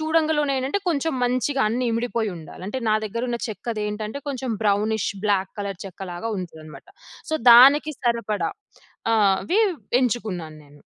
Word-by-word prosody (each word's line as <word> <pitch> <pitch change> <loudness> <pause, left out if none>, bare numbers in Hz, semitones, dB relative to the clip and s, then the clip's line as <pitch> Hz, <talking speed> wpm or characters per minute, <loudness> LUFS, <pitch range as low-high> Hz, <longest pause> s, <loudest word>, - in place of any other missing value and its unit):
చూడంగలోనే 310 -3 +1
ఏంటంటే 270 +10 -1
కొంచెం 320 -1 0
మంచిగా 255 +2 0
అన్నీ 245 +2 -1
ఇమిడిపోయి 230 -2 -1
ఉండాలి 165 +2 -10
అంటే 260 +4 -3
నా - - +4
దగ్గర 230 +4 -3
ఉన్న 235 - -2
చెక్కదేంటంటే 215 +2 -4
కొంచెం 260 -3 -3
బ్రౌనిష్, 210 +1 +1 0.2
బ్లాక్ 195 -2 +1
కలర్ 200 -3 -5
చెక్క 190 0 -8
లాగా 225 +6 -4
ఉంటుందనమాట. 160 -3 -9 0.4
సో, 315 - +1 0.2
దానికి 280 +5 +7
సరిపడా 225 -8 0 0.7
అవి 215 - +2 0.4
ఎంచుకున్నాను 200 -10 -2
నేను. 145 0 -19
230 Hz, 135 wpm, -23 LUFS, 195-265 Hz, 0.7 s, దానికి